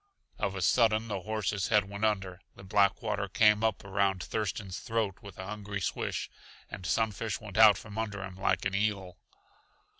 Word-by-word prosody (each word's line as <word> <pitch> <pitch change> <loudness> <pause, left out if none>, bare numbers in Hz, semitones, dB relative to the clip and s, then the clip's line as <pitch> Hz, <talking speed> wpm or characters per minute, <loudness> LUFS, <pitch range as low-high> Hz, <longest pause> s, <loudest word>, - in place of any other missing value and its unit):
Of 100 -1 -1
a 95 - -2
sudden 110 +1 +3
the 100 -3 -3
horse's 105 -1 -1
head 105 -3 +3
went 100 +2 -2
under; 95 -3 -1
the - - -13
black 100 +3 +2
water 105 -2 -1
came 105 +2 +4
up 110 -1 0
around 100 -2 0
Thurston's 100 -2 -3
throat 110 -5 -1
with 100 -2 -11
a 95 - -6
hungry 100 0 -5
swish, 90 - -2 0.4
and 90 - -6
Sunfish 110 0 0
went 105 -2 -5
out 105 -3 +8
from 105 0 -7
under 100 -3 -3
him 95 -2 -7
like 95 0 0
an 95 - 0
eel. 100 -3 -1
100 Hz, 180 wpm, -30 LUFS, 95-110 Hz, 0.4 s, out